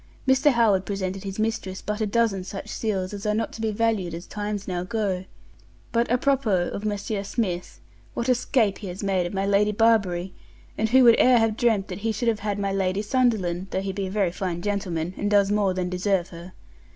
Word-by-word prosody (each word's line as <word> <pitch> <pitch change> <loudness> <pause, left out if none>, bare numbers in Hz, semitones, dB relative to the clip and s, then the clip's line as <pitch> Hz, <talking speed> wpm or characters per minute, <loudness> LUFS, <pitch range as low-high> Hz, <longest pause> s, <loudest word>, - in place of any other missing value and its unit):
Mr. 265 +2 +5
Howard 215 -6 +3
presented 195 -1 -4
his 195 -1 -5
mistress 215 -4 -2
but 210 +1 -4
a 215 - +1
dozen 205 -3 +1
such 195 +1 -7
seals 195 -4 -2
as 200 -1 -6
are 210 - +1
not 225 +1 -2
to 225 - -7
be 220 - 0
valued 210 -5 0
as 170 +2 -8
times 205 -1 -4
now 180 -2 -2
go. 190 -2 -2 0.7
But 235 0 +1
à 245 +1 +1
propos 245 -11 +1
of - - -4
Monsr. 205 -1 -2
Smith, 195 -4 -3 0.4
what 235 - -2
a 255 - +5
scape 230 -4 +1
has 185 -3 -6
he - - -3
made 185 -3 +1
of - - -8
my 195 0 0
Lady 200 +1 +3
Barbury; 200 -5 +2 0.4
and 220 +1 0
who 260 +2 +6
would 235 -1 +7
e'er 250 -1 +6
have 225 -1 +2
dreamt 220 -5 +1
he 205 +5 -2
should 230 +2 0
have 220 -2 0
had 205 -1 -2
my 200 -1 -1
Lady 195 +1 0
Sunderland, 205 -7 +1
though 190 - -2
he 195 0 -3
be 195 0 -3
a - - -5
very 195 -3 +1
fine 175 -1 -4
gentleman, 180 -5 -2
and 205 - -1
does 200 -1 +3
more 205 -3 +1
than 180 -1 -1
deserve 180 0 0
her. 170 +2 -11
200 Hz, 220 wpm, -25 LUFS, 185-225 Hz, 0.7 s, would